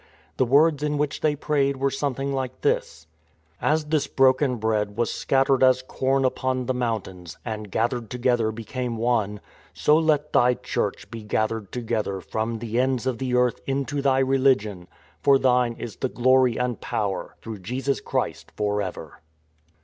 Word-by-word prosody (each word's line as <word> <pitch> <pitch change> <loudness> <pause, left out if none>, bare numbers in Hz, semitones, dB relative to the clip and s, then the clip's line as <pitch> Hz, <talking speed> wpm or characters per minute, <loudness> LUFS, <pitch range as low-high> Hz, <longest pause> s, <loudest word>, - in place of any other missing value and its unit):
The - - +3
words 145 +4 +4
in 150 0 0
which 145 -1 -2
they 150 -1 +2
prayed 140 -2 0
were 135 +1 0
something 140 0 -2
like 130 -2 -4
these: 80 - -1 0.3
" 80 +2 -37
As 155 0 +1
this 150 -1 0
broken 130 0 +3
bread 105 -2 -1
was 120 -1 0
scattered 135 0 +2
as 130 -1 +4
corn 135 +1 0
upon 130 0 -1
the 130 - 0
mountains; 105 -8 -4
and, 110 -3 -5
gathered 115 +3 -1
together^ 120 -3 +1
became 115 +2 -4
one; 110 -3 0 0.2
" - - -27
So 150 - +4
let 150 -2 +1
Thy 125 0 +4
Church - - -3
be 115 - -6
gathered 110 0 -2
together 110 -5 -2
from 110 +6 -3
the 115 +1 -2
ends 130 -1 +1
of 130 -3 -1
the 125 -2 -1
earth 125 -1 +2
into 140 +1 -1
Thy 135 -1 +3
religion. 135 -4 +3
illO 95 - -10
IN 90 - -16
TRAINING - - -31
"For 140 -1 +5
Thine 125 -2 +2
is 115 - -7
the 130 - -1
glory 130 -1 +3
and 125 -2 -2
power, 100 -3 -3
through 110 -3 -7
Jesus 130 +8 -2
Christ, - - -3
for 105 0 0
ever." 95 -2 -7
125 Hz, 180 wpm, -24 LUFS, 110-135 Hz, 0.3 s, For